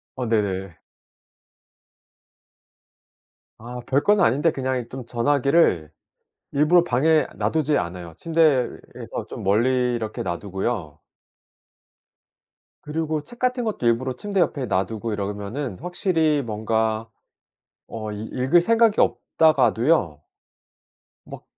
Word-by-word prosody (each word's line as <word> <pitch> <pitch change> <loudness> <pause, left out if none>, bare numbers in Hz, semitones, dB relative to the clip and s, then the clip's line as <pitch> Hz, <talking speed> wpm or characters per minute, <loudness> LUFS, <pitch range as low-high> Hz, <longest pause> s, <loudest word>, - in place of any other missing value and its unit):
어 130 - -3
네네. 95 -5 -1 2.8
아 120 +2 -8
별건 170 +10 +3
아닌데 150 +3 +3
그냥 130 -2 -2
좀 130 -2 -7
전화기를 125 - +2 0.6
일부러 155 +5 +4
방에 155 +3 +2
놔 - - 0
두지 155 -2 +1
않아요. 85 -2 -5
침대에서 155 -7 0
좀 - - -7
멀리 125 +5 +2
이렇게 110 -2 -4
놔 85 -1 -3
두고요. 95 -5 -4 1.9
그리고 155 0 -2
책 240 +9 -13
같은 250 -1 0
것도 215 - -3
일부러 120 +3 +1
침대 200 +5 -3
옆에 140 -6 +1
놔 95 -3 +1
두고 110 +2 -5
이러면은 105 +4 -4
확실히 165 -4 +1
뭔가 110 -1 -1 0.8
어 110 -1 -6
읽 105 +1 -6
읽을 130 +7 +3
생각이 225 +2 +3
없다가도요 130 - +2 1.0
막 - - -10
125 Hz, 225 characters per minute, -23 LUFS, 110-155 Hz, 2.8 s, 일부러